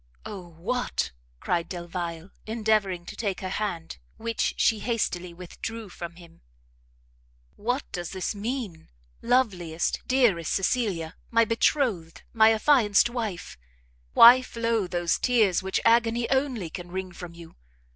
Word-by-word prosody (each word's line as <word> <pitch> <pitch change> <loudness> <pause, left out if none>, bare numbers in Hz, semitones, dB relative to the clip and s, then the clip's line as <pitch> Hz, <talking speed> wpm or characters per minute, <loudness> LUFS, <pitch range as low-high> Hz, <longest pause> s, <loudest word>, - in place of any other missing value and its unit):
"Oh 190 -4 -7
what," 245 +9 -2 0.3
cried 170 -1 -1
Delvile, 175 0 -5 0.2
endeavouring 215 -5 0
to - - -8
take 200 -5 -3
her 185 - -3
hand, 185 -6 -4 0.2
which 230 0 -1
she 220 - +3
hastily 185 -7 -2
withdrew 200 +5 -7
from 170 -1 -8
him, 170 -1 -16 1.1
"what 245 +6 -1
does 175 -2 -4
this 190 +2 -3
mean? 210 -6 -5 0.3
loveliest, 190 -10 0
dearest 230 - +2
Cecilia, 195 -6 -1
my 230 0 +4
betrothed, 225 - 0
my 220 -1 +6
affianced 225 -2 +4
wife! 215 - -5 0.5
why 245 +2 +9
flow 230 -5 -1
those 175 -1 0
tears 220 -8 +3
which 190 0 -1
agony 235 0 +3
only 260 - 0
can 175 0 -7
wring 185 0 -4
from 175 -1 -9
you? 170 -1 -13
200 Hz, 125 wpm, -26 LUFS, 175-230 Hz, 1.1 s, why